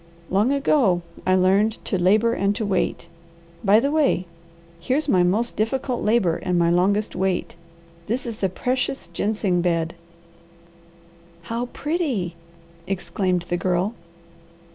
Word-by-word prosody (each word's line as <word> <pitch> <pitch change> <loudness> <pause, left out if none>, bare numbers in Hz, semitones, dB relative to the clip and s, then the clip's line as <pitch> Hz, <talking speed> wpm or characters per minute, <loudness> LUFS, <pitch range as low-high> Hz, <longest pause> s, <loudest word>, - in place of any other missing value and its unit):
Long 205 +7 +3
ago 265 - +2 0.2
I 185 - +4
learned 195 +4 +3
to - - -1
'labour 215 +6 +3
and 200 -1 0
to 220 - -2
wait.' 190 -3 -1 0.6
By 205 +1 +6
the 280 +4 0
way 290 - +2 0.5
here's 265 - -1
my 185 -10 +4
most 205 +7 +1
difficult 245 +3 -1
labour 210 -6 +2
and 180 -1 -1
my 170 0 +3
longest 200 +4 +1
wait. 185 0 -1 0.5
This 245 +5 -1
is 230 -3 -5
the 195 - 0
precious 255 0 -2
gingseng 200 -2 0
bed." 165 -2 0 1.5
"How 230 +7 -3
pretty!" 275 - -2 0.5
exclaimed 185 -1 -1
the 175 0 -2
Girl. 180 +4 0
200 Hz, 130 wpm, -23 LUFS, 180-235 Hz, 1.5 s, By